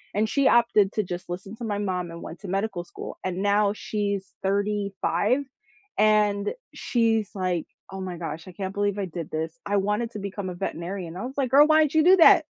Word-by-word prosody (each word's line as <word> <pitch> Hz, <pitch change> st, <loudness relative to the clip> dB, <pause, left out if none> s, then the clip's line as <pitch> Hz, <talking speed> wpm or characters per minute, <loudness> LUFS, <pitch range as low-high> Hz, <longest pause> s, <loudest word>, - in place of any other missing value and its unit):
and 215 Hz, +1 st, +2 dB
she 275 Hz, +2 st, +3 dB
opted 230 Hz, -5 st, +4 dB
to 215 Hz, -, 0 dB
just 175 Hz, 0 st, -6 dB
listen 185 Hz, +4 st, -6 dB
to 240 Hz, -, -8 dB
my 205 Hz, -2 st, -1 dB
mom 185 Hz, -4 st, -2 dB
and 170 Hz, -, -9 dB
went 170 Hz, -, -8 dB
to 200 Hz, -, -8 dB
medical 195 Hz, -1 st, -1 dB
school, -, -, -9 dB
and 185 Hz, -1 st, -2 dB
now 205 Hz, 0 st, +3 dB
she's 200 Hz, -3 st, -3 dB
35, 205 Hz, +4 st, 0 dB, 0.6 s
and 210 Hz, -, +3 dB, 0.2 s
she's 225 Hz, -3 st, +1 dB
like, 180 Hz, -4 st, -1 dB, 0.3 s
"Oh 195 Hz, 0 st, -6 dB
my 180 Hz, -2 st, -5 dB
gosh, 165 Hz, 0 st, -6 dB
I 185 Hz, -, -10 dB
can't 190 Hz, +1 st, -4 dB
believe 205 Hz, 0 st, 0 dB
I 200 Hz, -, -1 dB
did 170 Hz, -3 st, -6 dB
this. 160 Hz, +1 st, -4 dB
I 205 Hz, -, 0 dB
wanted 210 Hz, +4 st, 0 dB
to 215 Hz, -, -6 dB
become 195 Hz, -1 st, -5 dB
a 180 Hz, -, -6 dB
veterinarian." 175 Hz, -1 st, -5 dB
I 210 Hz, -, -4 dB
was 265 Hz, +2 st, -7 dB
like, 260 Hz, -3 st, 0 dB
"Girl, 290 Hz, +2 st, +7 dB
why 315 Hz, 0 st, +6 dB
did 300 Hz, -, -1 dB
you 315 Hz, -, +5 dB
do 370 Hz, +3 st, +8 dB
that?" 330 Hz, -, +7 dB
200 Hz, 215 wpm, -25 LUFS, 185-215 Hz, 0.6 s, do